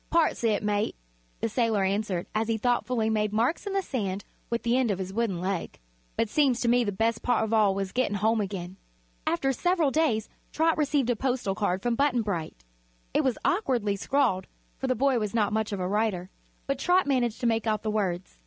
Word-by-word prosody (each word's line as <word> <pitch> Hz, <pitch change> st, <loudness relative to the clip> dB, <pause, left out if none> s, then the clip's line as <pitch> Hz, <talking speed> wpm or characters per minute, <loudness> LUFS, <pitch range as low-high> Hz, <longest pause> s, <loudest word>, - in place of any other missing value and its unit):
"Parts 330 Hz, -6 st, +2 dB
o' -, -, +4 dB
it, 210 Hz, -2 st, +1 dB
mate," 210 Hz, 0 st, 0 dB, 0.5 s
the -, -, +1 dB
sailor 225 Hz, -3 st, +1 dB
answered, 195 Hz, -2 st, -1 dB
as 220 Hz, +1 st, 0 dB
he 225 Hz, -1 st, +1 dB
thoughtfully 245 Hz, 0 st, +1 dB
made 215 Hz, -1 st, +1 dB
marks 235 Hz, -, 0 dB
in 395 Hz, -, -2 dB
the 390 Hz, -1 st, +1 dB
sand 200 Hz, -, -3 dB, 0.2 s
with 235 Hz, 0 st, -2 dB
the 235 Hz, +1 st, +2 dB
end 255 Hz, -3 st, +2 dB
of 200 Hz, -, 0 dB
his 190 Hz, 0 st, -5 dB
wooden 215 Hz, -5 st, 0 dB
leg; 185 Hz, 0 st, -3 dB, 0.4 s
"but 225 Hz, -, +2 dB
seems 260 Hz, +1 st, +2 dB
to 240 Hz, -, 0 dB
me 245 Hz, +1 st, +4 dB
the 205 Hz, -, -1 dB
bes' 225 Hz, +3 st, 0 dB
part 245 Hz, -2 st, +1 dB
of 220 Hz, 0 st, -2 dB
all 210 Hz, -3 st, +4 dB
was 195 Hz, -1 st, -2 dB
gett'n' 250 Hz, -5 st, +1 dB
home 220 Hz, +2 st, +2 dB
again." 190 Hz, -2 st, -5 dB, 0.5 s
After 270 Hz, +10 st, +1 dB
several 345 Hz, -1 st, +1 dB
days 250 Hz, -9 st, +1 dB, 0.2 s
Trot 320 Hz, +1 st, +2 dB
received 285 Hz, -4 st, +1 dB
a -, -, +1 dB
postal 245 Hz, -4 st, -1 dB
card 190 Hz, -2 st, -1 dB
from 240 Hz, -, +1 dB
Button 250 Hz, -2 st, +2 dB
Bright. 165 Hz, -, -4 dB, 0.5 s
It -, -, +2 dB
was 260 Hz, -3 st, +1 dB
awkwardly 245 Hz, -, +1 dB
scrawled, 215 Hz, -4 st, +1 dB, 0.3 s
for 265 Hz, -, -2 dB
the 255 Hz, -, +1 dB
boy 265 Hz, 0 st, +2 dB
was 210 Hz, 0 st, -3 dB
not 210 Hz, -2 st, +2 dB
much 220 Hz, 0 st, 0 dB
of 200 Hz, -, -3 dB
a 180 Hz, -, -1 dB
writer, 200 Hz, -2 st, -1 dB, 0.3 s
but 275 Hz, -1 st, -2 dB
Trot 360 Hz, +4 st, +3 dB
managed 245 Hz, -5 st, 0 dB
to -, -, -1 dB
make 225 Hz, -1 st, +1 dB
out 215 Hz, -1 st, 0 dB
the 215 Hz, -, -1 dB
words. 190 Hz, -4 st, -2 dB
225 Hz, 220 wpm, -27 LUFS, 200-255 Hz, 0.5 s, o